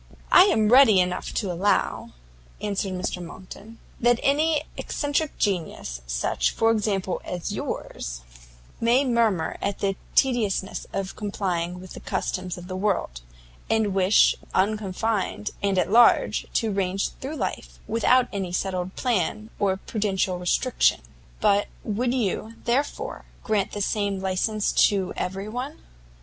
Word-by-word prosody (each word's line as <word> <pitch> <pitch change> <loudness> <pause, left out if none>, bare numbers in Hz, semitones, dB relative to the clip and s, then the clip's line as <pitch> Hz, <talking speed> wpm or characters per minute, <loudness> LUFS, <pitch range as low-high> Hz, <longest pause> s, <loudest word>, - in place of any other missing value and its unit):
"I 365 - +9
am 220 - +3
ready 250 -7 +7
enough 180 0 -1
to 200 -5 -1
allow," 190 +4 0 0.5
answered 200 -2 -2
Mr 180 -1 -3
Monckton, 190 +6 -11 0.2
"that 240 0 +3
an 300 +2 +2
eccentric 290 +1 -2
genius, 165 - -2
such, - - 0
for 225 0 +2
example, 200 -4 -1
as 175 -1 -4
yours, - - -5 0.6
may 240 +4 +3
murmur 225 -9 +1
at 200 -1 -1
the 195 -1 -1 0.2
tediousness 220 -7 +1
of 195 -1 -4
complying 180 -4 -2
with 185 0 -10
the - - -8
customs 180 -1 -3
of 180 0 -9
the 185 - -5
world, 185 - -1 0.5
and 220 -3 +2
wish, 190 +1 +5 0.2
unconfined, 200 - 0
and 200 -1 +1
at 185 - +1
large, 235 +2 +5
to 225 -2 +1
range 195 0 0
through 280 +4 -4
life - - -4
without 245 +2 +3
any 190 -3 -3
settled 185 0 -2
plan 215 -2 -1
or 190 -2 +1
prudential 195 -3 -1
restriction; 180 +8 +2 0.4
but 205 -1 +3 0.2
would 235 +4 -1
you, 225 -2 -2
therefore, 270 +5 -2 0.2
grant 210 -4 0
the 205 - -3
same 200 -2 -1
licence 195 +3 0
to 195 -3 +2
every 195 +2 -3
one? 250 +7 -5
200 Hz, 135 wpm, -25 LUFS, 185-225 Hz, 0.6 s, I